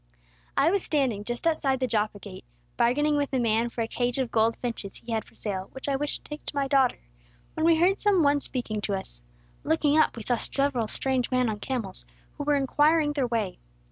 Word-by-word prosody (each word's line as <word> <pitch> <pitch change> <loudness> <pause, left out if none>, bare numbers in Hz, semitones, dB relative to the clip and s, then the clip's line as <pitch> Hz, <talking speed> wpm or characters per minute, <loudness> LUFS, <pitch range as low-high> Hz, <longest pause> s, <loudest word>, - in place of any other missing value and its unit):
"I 315 +4 +4
was 395 0 +1
standing 260 -11 0
just 240 +6 -4
outside 280 -5 +1
the 260 - +1
Joppa 215 -3 0
gate, 190 -4 -10 0.3
bargaining 295 +5 +2
with 285 -1 -1
a 260 - +2
man 230 0 +1
for 235 - -4
a 225 - 0
cage 245 +2 -1
of 260 -3 -1
gold 225 0 +2
finches 230 -5 -3
he 235 - -9
had 220 -1 0
for - - -21
sale, 195 -3 -4
which 265 - -7
I 280 - +1
wished 290 +2 -3
to - - -15
take 300 0 -7
to - - -4
my 280 -1 +1
daughter, 270 -2 +3 0.6
when 315 +1 +1
we 335 - +6
heard 360 +5 +3
some 395 -5 +3
one 285 0 +3
speaking 225 -6 -2
to 200 -1 -1
us. 190 - -5 0.4
Looking 310 -1 +2
up 310 - +3
we 225 - -5
saw 245 +2 +1
several 275 -3 0
strange 260 +1 0
men 255 -2 +2
on 210 -1 -3
camels, 225 -6 -4 0.3
who 290 - -4
were 295 0 +3
inquiring 295 +2 +3
their 275 -4 0
way. 225 -5 -2
255 Hz, 225 wpm, -27 LUFS, 225-290 Hz, 0.6 s, we